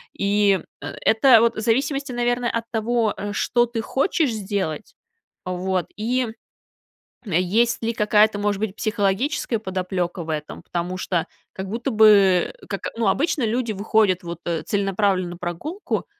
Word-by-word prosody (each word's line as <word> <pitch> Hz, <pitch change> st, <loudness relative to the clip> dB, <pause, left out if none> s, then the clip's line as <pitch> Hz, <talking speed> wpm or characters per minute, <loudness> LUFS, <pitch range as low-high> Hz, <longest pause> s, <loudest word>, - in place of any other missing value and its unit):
И, 200 Hz, -1 st, +2 dB, 0.2 s
э, -, -, -6 dB
это 225 Hz, +1 st, +6 dB
вот 235 Hz, 0 st, +2 dB
в -, -, -4 dB
зависимости, 275 Hz, +4 st, 0 dB
наверное, 245 Hz, 0 st, 0 dB
от 230 Hz, 0 st, -2 dB
того, 225 Hz, -1 st, 0 dB
э, 205 Hz, 0 st, -4 dB
что 240 Hz, +3 st, +2 dB
ты 230 Hz, -1 st, -4 dB
хочешь 275 Hz, -, 0 dB
сделать, 195 Hz, -7 st, -3 dB, 0.5 s
вот, 185 Hz, 0 st, -2 dB
и, 240 Hz, +2 st, 0 dB, 1.0 s
м, 200 Hz, -, -7 dB
есть 210 Hz, +9 st, +2 dB
ли 230 Hz, -, +1 dB
какая-то, 210 Hz, 0 st, +3 dB
может 205 Hz, -1 st, 0 dB
быть, 210 Hz, -2 st, -3 dB
психологическая 220 Hz, +4 st, 0 dB
подоплека 185 Hz, -3 st, -3 dB
в 160 Hz, -, -10 dB
этом? 150 Hz, -1 st, -4 dB
Потому 175 Hz, +1 st, -3 dB
что 180 Hz, -2 st, -1 dB, 0.3 s
как 190 Hz, 0 st, -6 dB
будто 235 Hz, +5 st, -2 dB
бы 205 Hz, -5 st, +5 dB, 0.2 s
как, 200 Hz, -, -3 dB, 0.2 s
ну, 230 Hz, -2 st, +1 dB
обычно 280 Hz, -, +1 dB
люди 235 Hz, +1 st, -1 dB
выходят 205 Hz, -2 st, +2 dB
вот, 170 Hz, -1 st, -6 dB
э, 170 Hz, -2 st, -1 dB
целенаправленно 195 Hz, -2 st, 0 dB
на 175 Hz, -, -8 dB
прогулку 180 Hz, -, -4 dB
210 Hz, 150 wpm, -22 LUFS, 185-235 Hz, 1.0 s, это